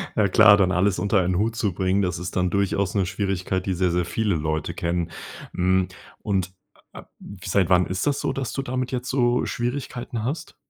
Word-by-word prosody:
Ja, 105 -2 +3
klar 105 +2 +7
dann 95 -2 +3
alles 95 +2 +2
unter 100 -1 +2
ein 90 0 0
Hut 110 +2 0
zu 105 -5 -1
bringen 95 +2 +1
das 90 -2 -1
ist 90 0 -6
dann 90 -1 +1
durchaus 100 -1 0
'ne 95 -2 +2
Schwierigkeit 95 0 -2
die 95 - 0
sehr 90 0 +1
sehr 90 -1 0
viele 100 +2 0
Leute 80 0 -2
kennen. 85 0 -2 0.4
Hm, 95 0 +2 0.3
und, 95 -3 -1 0.4
äh, - - -10 0.4
seit 95 -2 +1
wann 90 -1 +4
ist 95 +8 -2
das 140 - +1
so, - - -1
dass 135 -3 -4
du 135 - -2
damit 130 -1 -3
jetzt 125 0 -3
so 125 -2 +2
Schwierigkeiten 120 -2 -4
hast? 140 +7 -4
95 Hz, 200 wpm, -24 LUFS, 90-110 Hz, 0.4 s, klar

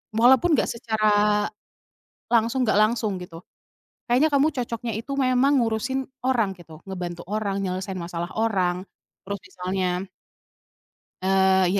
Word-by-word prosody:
walaupun 260 +8 +5
nggak - - +1
secara 210 -2 +2 0.9
langsung, 235 +3 +3
nggak 215 - +2
langsung 220 -1 +1
gitu. 170 -1 -10 0.6
Kayaknya 255 +6 +3
kamu 280 +2 +4
cocoknya 235 -3 -3
itu 270 - -9
memang 265 +1 +3
ngurusin 235 +2 0 0.3
orang, 230 -7 +2
gitu, 165 -4 -14
ngebantu 175 -3 -5
orang, 205 0 -2
nyelesain 185 +1 -3
masalah 175 0 -4
orang, 195 -6 +1 0.5
terus 200 +1 -5
misalnya" 185 0 -2 1.3
"Eee, 190 0 +4
210 Hz, 115 wpm, -24 LUFS, 185-240 Hz, 1.3 s, walaupun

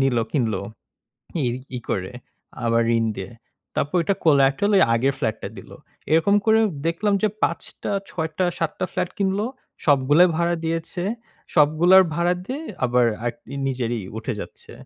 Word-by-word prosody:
নিল 135 -3 +2
কিনল। 115 -7 +1 0.9
ই - - +1 0.3
ই - - -2
করে, 95 +4 -2 0.5
আবার 115 0 +3
ঋণ 115 - +1
দিয়ে। 95 0 -6 0.5
তারপর 145 +6 0
ওটা 195 +4 +1
collaterally 150 +7 +4
আগের 135 +4 +1
ফ্লাটটা 110 -6 -2
দিলো। - - -11 0.4
এরকম 165 +6 +4
করে 220 0 +5 0.3
দেখলাম 200 +5 +1
যে 215 - +4 0.2
৫ 170 - -1 0.2
টা, - - -2 0.2
৬ 160 -2 -3
টা, 185 - +3
৭ 165 - -1
টা 185 - +1
ফ্ল্যাট 180 -1 -1
কিনল। 195 0 +1 0.5
সবগুলাই 145 +5 +5
ভাড়া 170 0 +1
দিয়েছে। 165 +2 -3 0.5
সবগুলার 165 +5 +6
ভাড়া 175 +2 +2
দিয়ে 275 +7 -4 0.2
আবার 125 0 +3 0.2
আরকি 120 +3 -5
নিজেরই 120 -3 -2 0.2
উঠে 115 +3 -3
যাচ্ছে। - - -10
155 Hz, 150 wpm, -23 LUFS, 125-180 Hz, 0.9 s, সবগুলার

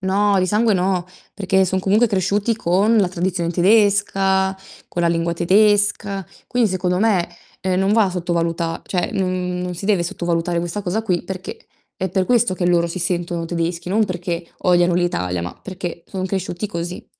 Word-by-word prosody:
No, 200 +1 +2
di 185 - +1
sangue 215 +1 +2
no, 180 -1 0 0.3
perché 190 -1 +1
son 190 +1 0
comunque 210 +5 +3
cresciuti 200 +3 0
con 200 +6 +2
la 200 -3 +4
tradizione 175 -1 -2
tedesca, 195 0 +3 0.3
con 175 - -3
la - - +3
lingua 170 0 0
tedesca. 200 +2 +2 0.2
Quindi 245 -2 +2
secondo 180 -1 0
me, 200 -6 +2 0.3
ehm, 185 0 0
non 195 +2 +2
va 215 -4 +3
sottovaluta 170 -2 -2
cioè 180 -2 -1
non 185 -2 -1
non 180 0 -4
si 195 - -6
deve 200 -5 +2
sottovalutare 170 0 -1
questa 175 +4 -3
cosa 200 +4 -1
qui 180 -5 0
perché 185 0 -7 0.3
è 190 - -2
per 185 +1 0
questo 240 -4 +2
che 175 -1 -1
loro 170 -1 +2
si 185 - -5
sentono 175 -1 -1
tedeschi, 170 +1 -3
non 215 +3 +2
perché 175 -3 -4
odiano 175 -1 +3
l'Italia, 90 - -1
ma 90 +1 -5
perché 175 -3 -6
sono 190 -2 -4
cresciuti 190 +1 -3
così. 175 -2 -5
185 Hz, 175 wpm, -20 LUFS, 175-200 Hz, 0.3 s, la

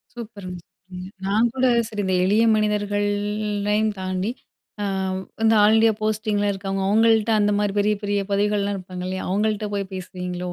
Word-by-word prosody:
சூப்பருங்க! 205 -6 -8
சூப்பருங்க! 180 +1 -11 0.2
நான் 215 +4 +2
கூட 260 0 +2 0.2
சரி 210 -2 -3
இந்த 190 0 0
எளிய 210 +4 +3
மனிதர்கள்லையும் 210 0 0
தாண்டி, 185 +2 -2 0.5
அ - - -1 0.6
இந்த 225 0 +5
ஆல் 210 +1 +5
இண்டியா 225 0 +5
போஸ்டிங்ல 215 -1 0
இருக்கிறவங்க, 195 0 -3
அவுங்கள்ட்ட 225 +1 +3
அந்த 205 0 +2
மாரி 205 -1 0
பெரிய 210 +1 +2
பெரிய 205 0 0
பதவிகள்லாம் 205 0 +1
இருப்பாங்க, 185 -1 -7
இல்லையா? 185 0 -4
அவங்கள்ட்ட 210 +1 0
போய் 200 -1 -3
பேசுவீங்களோ, 180 -1 -5
205 Hz, 150 wpm, -23 LUFS, 190-215 Hz, 0.6 s, இந்த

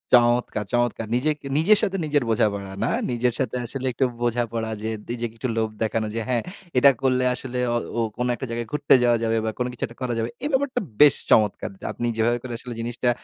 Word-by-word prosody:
চমৎকার, 120 -3 +2
চমৎকার! 120 -2 +1
নিজেকে 150 +3 -1
নিজের 200 +7 +5
সাথে 195 -3 0
নিজের 145 -2 +1
বোঝাপড়া 100 -3 0
না? 115 - +1 0.2
নিজের 120 0 +1
সাথে 125 -3 -1
আসলে 130 +2 -5
একটু 130 - +2 0.2
বোঝাপড়া 115 -1 -1
যে 110 - -2 0.2
নিজেকে 120 -2 -3
একটু 130 +2 -2
লোভ 110 -1 +1
দেখানো। 110 0 0
যে - - 0
হ্যাঁ, 120 -2 +1 0.3
এটা 140 +2 +8
করলে 130 -1 +2
আসলে 125 0 -4 0.2
অ - - +3 0.2
ও - - +1 0.2
কোন 125 - 0
একটা 130 - -5
জায়গায় 115 0 -3
ঘুরতে 150 -2 +4
যাওয়া 120 -1 +4
যাবে 115 0 +1
বা 110 - 0
কোন 125 - +1
কিছু 125 - -7
একটা 115 - -15
করা 125 -1 -1
যাবে। 115 +1 -1
এই 290 - 0
ব্যাপারটা 265 -1 +1 0.2
বেশ 150 -2 +8 0.2
চমৎকার। 105 -2 +3
যা - - -8
আপনি 120 - -2
যেভাবে 120 +2 +2
করে 125 -2 -5
আসলে 125 -1 -7
জিনিসটা 120 +1 -1
120 Hz, 215 wpm, -24 LUFS, 115-130 Hz, 0.3 s, এটা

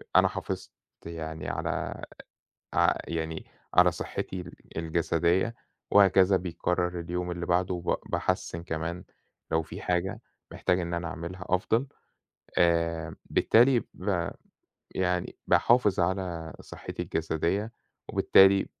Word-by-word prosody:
أنا - - +7
حافظت - - -5 0.3
يعني 80 -1 -5
على - - -3 0.7
ع - - +5 0.2
يعني 80 -1 -3 0.3
على - - +6
صحتي 95 - -4
ال 90 - -9 0.2
الجسدية، 85 +5 +1 0.4
وهكذا 95 -1 +6
بيكرَّر 90 0 -1
اليوم 90 +1 -3
اللي 85 0 -4
بعده، 90 +1 +1
وب 85 0 0
باحسِّن 85 0 -1
كمان، 85 +2 -4 0.5
لو 80 0 +3
في 80 - -9
حاجة 90 +1 -1 0.3
محتاج 90 0 +1
إن 85 0 -3
أنا 85 0 -2
أعملها 85 +3 -6
أفضل. 110 +8 +1 0.7
آآ، 85 -2 +2
بالتالي، 120 +1 +4
ب 90 -3 -1 0.7
يعني 90 -1 -1
باحافظ 105 -5 +4
على 85 -3 -2
صحتي - - -7
الجسدية، 85 +7 -1 0.4
وبالتالي 95 0 +5
90 Hz, 110 wpm, -28 LUFS, 85-95 Hz, 0.7 s, أنا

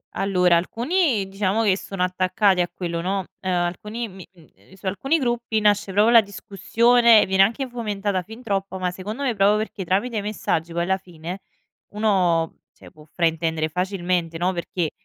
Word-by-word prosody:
Allora 180 -3 +3
alcuni, 240 - 0
diciamo 195 +2 0
che 200 -4 +3
sono 195 -1 -4
attaccati 185 +1 +2
a 175 - -1
quello, 170 -2 -4
no, 190 +2 -1 0.2
ehm, 185 - -3
alcuni 185 +6 -2
mi 190 -2 -11
mhmm, 170 -4 -20
ehm, - - -23
su 190 - -16
alcuni 235 - 0
gruppi 240 -5 -1
nasce 205 -1 +2
proprio 210 +4 +4
la 230 - +9
discussione, 220 +3 +3
viene 190 0 +2
anche 235 +7 +2
fomentata 205 -5 -2
fin 220 +6 -12
troppo, 195 -3 -2
ma 180 -1 -1
secondo 210 +9 -6
me 255 -3 +1
proprio 200 +1 +4
perché 215 -2 -4
tramite 200 +7 -1
i - - 0
messaggi 185 -5 -2
poi 170 +1 -1
alla 190 +2 +1
fine 175 +1 -8 0.6
uno, 180 -6 +1
cioè, - - -16
può 150 0 -17
fraintendere 165 -2 0
facilmente, 180 -1 -2
no, 180 +3 0
perché 170 -2 -3
195 Hz, 175 wpm, -23 LUFS, 180-215 Hz, 0.6 s, la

